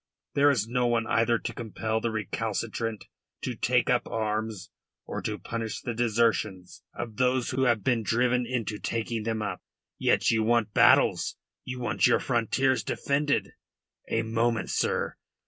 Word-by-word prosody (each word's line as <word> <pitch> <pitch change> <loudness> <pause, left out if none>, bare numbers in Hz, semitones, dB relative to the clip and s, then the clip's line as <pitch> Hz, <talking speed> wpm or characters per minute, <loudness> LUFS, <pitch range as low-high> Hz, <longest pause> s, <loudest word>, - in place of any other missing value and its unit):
There 145 +1 +5
is 115 -7 +1
no 125 +1 +1
one 115 -1 +1
either 115 0 +2
to - - -5
compel 110 -1 -3
the 115 - 0
recalcitrant 110 +1 -3 0.4
to 125 - -2
take 125 +2 +2
up 125 -1 +2
arms, 110 -3 -3 0.3
or - - -4
to - - -3
punish 115 -2 -4
the 120 - -4
desertions 110 -5 0
of 110 -3 -6
those 130 -1 +1
who 130 +1 +1
have 120 -5 +2
been 125 -3 +2
driven 125 +2 +1
into 115 -4 -2
taking 115 0 -2
them 110 0 -2
up. 100 -3 -4 0.4
Yet - - +3
you 110 -1 +2
want 110 -1 +2
battles, - - +4 0.3
you 125 0 -5
want 120 - +2
your - - +4
frontiers 130 0 +1
defended. 140 +6 0 0.6
A 115 - +1
moment, 115 0 0
sir! - - 0
115 Hz, 155 wpm, -27 LUFS, 110-125 Hz, 0.6 s, There